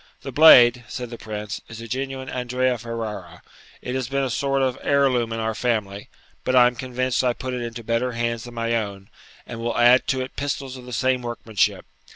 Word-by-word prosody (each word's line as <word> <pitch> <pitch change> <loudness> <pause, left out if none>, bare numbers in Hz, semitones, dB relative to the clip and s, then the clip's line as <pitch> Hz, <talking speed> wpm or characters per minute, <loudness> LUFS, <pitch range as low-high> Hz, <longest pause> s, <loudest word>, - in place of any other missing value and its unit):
'The 135 - -6
blade,' 125 -4 +7
said 125 +2 -6
the 120 - -7
Prince, 105 -1 -6
'is 115 -1 -9
a 115 - -8
genuine 130 +2 -4
Andrea 125 0 -1
Ferrara; 115 -2 -6 0.4
it 125 - -4
has 130 -2 -2
been 140 0 0
a 130 - -2
sort 135 +2 0
of 130 -2 0
heir 140 -1 +3
loom 120 -2 0
in 115 - -3
our 110 0 -1
family; 105 -4 -2 0.3
but 130 - 0
I 125 -1 +8
am 125 - +2
convinced 130 +1 -1
I 125 -1 +2
put 130 +1 -5
it 125 - -3
into 120 0 -6
better 115 +2 -1
hands 115 -1 -2
than 120 -1 -10
my 115 0 -1
own, 100 -3 -4 0.3
and 115 - -8
will 115 0 -2
add 120 +2 +5
to 130 -1 0
it 130 - -7
pistols 140 -2 -3
of 125 -1 -11
the 125 - -10
same 130 +3 +1
workmanship. 115 -3 -1
120 Hz, 215 wpm, -23 LUFS, 115-130 Hz, 0.4 s, I